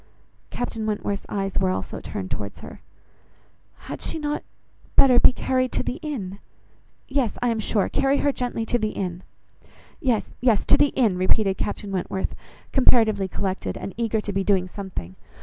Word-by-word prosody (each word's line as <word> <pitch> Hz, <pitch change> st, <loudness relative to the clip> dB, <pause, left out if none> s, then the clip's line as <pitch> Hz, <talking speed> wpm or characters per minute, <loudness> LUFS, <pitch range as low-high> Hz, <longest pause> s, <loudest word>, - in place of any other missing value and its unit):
Captain 225 Hz, -3 st, -3 dB
Wentworth's 205 Hz, -2 st, -2 dB
eyes 195 Hz, -1 st, -1 dB
were -, -, +2 dB
also 95 Hz, +1 st, -3 dB
turned 95 Hz, -1 st, -6 dB
towards 100 Hz, -1 st, -4 dB
her. -, -, -10 dB, 1.0 s
"Had -, -, -7 dB, 0.2 s
not 295 Hz, 0 st, -1 dB
she -, -, -36 dB, 0.5 s
better 255 Hz, -3 st, +7 dB
be -, -, +7 dB
carried 255 Hz, 0 st, 0 dB
to -, -, +1 dB
the 255 Hz, -, -3 dB
inn? 235 Hz, -, -5 dB, 0.7 s
Yes, 265 Hz, -5 st, 0 dB
I 245 Hz, -, +3 dB
am 225 Hz, -1 st, 0 dB
sure: 210 Hz, -1 st, +1 dB
carry 275 Hz, +1 st, +2 dB
her 285 Hz, -, +2 dB
gently 245 Hz, -3 st, -2 dB
to 240 Hz, +2 st, +1 dB
the 215 Hz, -1 st, -1 dB
inn." 180 Hz, -2 st, -3 dB, 0.8 s
"Yes, 245 Hz, -6 st, 0 dB
yes, 235 Hz, -5 st, +3 dB
to -, -, +6 dB
the 290 Hz, -, +5 dB
inn," 215 Hz, -8 st, +2 dB
repeated 195 Hz, +1 st, +2 dB
Captain 205 Hz, -1 st, -3 dB
Wentworth, 190 Hz, 0 st, -2 dB, 0.4 s
comparatively 220 Hz, -7 st, +4 dB
collected, 190 Hz, +1 st, -2 dB
and 195 Hz, -, -6 dB
eager 225 Hz, -1 st, 0 dB
to 205 Hz, -1 st, -4 dB
be 195 Hz, 0 st, +1 dB
doing 190 Hz, -2 st, +2 dB
something. 180 Hz, -, -6 dB
215 Hz, 165 wpm, -24 LUFS, 190-245 Hz, 1.0 s, better